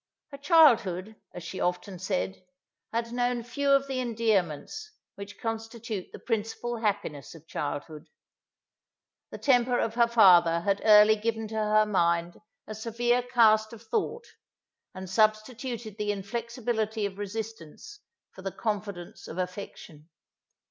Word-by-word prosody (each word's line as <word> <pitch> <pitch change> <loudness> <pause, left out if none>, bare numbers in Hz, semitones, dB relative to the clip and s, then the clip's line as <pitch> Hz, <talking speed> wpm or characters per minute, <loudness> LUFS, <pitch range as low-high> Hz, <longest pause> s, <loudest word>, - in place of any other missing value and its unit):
Her 280 - -9
childhood, 225 - +4 0.2
as 175 - -9
she 185 +3 -6
often 180 +1 -2
said, 95 - -3 0.5
had 230 0 -2
known 245 0 -1
few 280 +4 -2
of 275 0 +4
the 265 -1 -2
endearments, 225 - -1 0.2
which 200 0 -10
constitute 225 -3 -5
the - - -9
principal 230 +1 -3
happiness 205 - -3
of 160 -1 -15
childhood. 150 +1 -5 1.2
The - - -8
temper 245 -2 +3
of 225 - -1
her 235 0 +4
father 175 -7 +6
had 200 +2 0
early 210 0 +7
given 225 +1 -2
to - - -9
her 215 0 +3
mind 170 -3 0 0.2
a 215 - -7
severe 240 +3 0
cast 225 -3 +3
of 230 0 -12
thought, 445 - -2 0.7
and 190 0 -7
substituted 220 +2 -1
the 210 0 0
inflexibility 220 +1 -3
of 200 0 -6
resistance 215 - -7 0.3
for - - -13
the 195 0 -4
confidence 200 -5 -5
of 165 - -8
affection. 180 -4 -7
215 Hz, 135 wpm, -28 LUFS, 190-235 Hz, 1.2 s, early